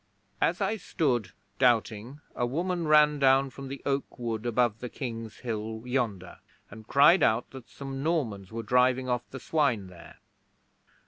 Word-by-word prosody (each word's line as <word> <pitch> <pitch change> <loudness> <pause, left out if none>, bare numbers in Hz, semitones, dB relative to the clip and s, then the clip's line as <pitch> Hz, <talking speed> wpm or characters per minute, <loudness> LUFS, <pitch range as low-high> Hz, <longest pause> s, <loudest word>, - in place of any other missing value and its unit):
'As 175 +4 +1
I 205 +3 0
stood 130 - -1 0.3
doubting, 120 +1 +1
a 120 - 0
woman 170 +5 -2
ran 150 -1 +5
down 135 0 +4
from 135 +4 -9
the 135 0 -8
oak 140 0 -2
wood 115 -2 -3
above 120 -2 +1
the 125 - -6
King's 115 -5 -6
Hill 110 -2 -4
yonder, 115 -8 -2 0.3
and 110 0 -12
cried 150 +8 +6
out 110 +2 +2
that 130 -3 -11
some 135 -1 -7
Normans 120 - -2
were 115 +1 -5
driving 125 +3 +2
off 125 -1 -2
the 135 - -8
swine 125 -9 0
there. 90 -2 -14
125 Hz, 155 wpm, -28 LUFS, 115-140 Hz, 0.3 s, cried